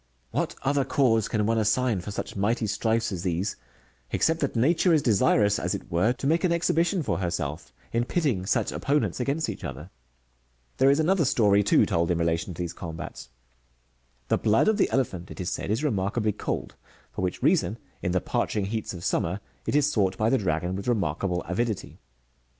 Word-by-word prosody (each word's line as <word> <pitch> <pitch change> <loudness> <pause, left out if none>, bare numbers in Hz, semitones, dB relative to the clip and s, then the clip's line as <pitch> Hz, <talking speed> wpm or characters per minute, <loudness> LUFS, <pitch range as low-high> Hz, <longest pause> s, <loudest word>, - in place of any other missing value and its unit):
"Wliat - - -1
other 140 0 +2
cause 125 -6 +2
can 105 -2 0
one 115 +1 +2
assign 110 -1 +1
for 90 - -7
such 100 - -5
mighty 110 +4 0
strifes 110 +2 0
as 90 -3 -4
these, 90 +1 -1 0.5
except 160 0 +1
that 140 -5 -1
Xature 160 +9 +3
is 155 -3 +3
desirous, 105 -2 +3
as - - -1
it - - -9
were, 90 +8 +3
to 135 - -7
make 165 +5 +2
an 180 - +2
exhibition 170 +1 +1
for - - -1
herself, 85 -7 -3 0.2
in 120 +1 +1
pitting 125 - 0
such - - +1
opponents 145 -1 0
against 140 +5 0
each - - -6
other - - -5
r - - -11 0.9
There 135 - +5
is 140 +2 +4
another 170 +2 +3
story, 105 -6 +4
too, 100 - +4
told 85 0 0
in 90 - +1
relation 85 +1 -1
to - - -13
these 85 0 -5
combats 85 -6 -7 0.5
— - - -41
the - - +2
blood 110 - +3
of 220 -1 +3
the - - +2
elephant, 95 -9 -1
it - - -10
is 90 0 -2
said, - - -4
is 110 +7 0
remarkably 105 -3 0
cold; - - -4 0.4
for - - -5
which 90 -1 -2
reason, 100 +6 +2 0.2
in 90 - -1
the 95 - +2
parching 105 -2 -1
heats 110 -1 -3
of 85 - -7
summer,'^ 90 +4 0 0.3
it - - 0
is 150 0 +3
sought 95 -3 +1
by 110 +2 +2
the 135 - +3
dragon 90 -1 -1
with 100 +3 -5
remarkable 90 -5 0
avidity. 110 +3 -3
105 Hz, 200 wpm, -26 LUFS, 90-135 Hz, 0.9 s, There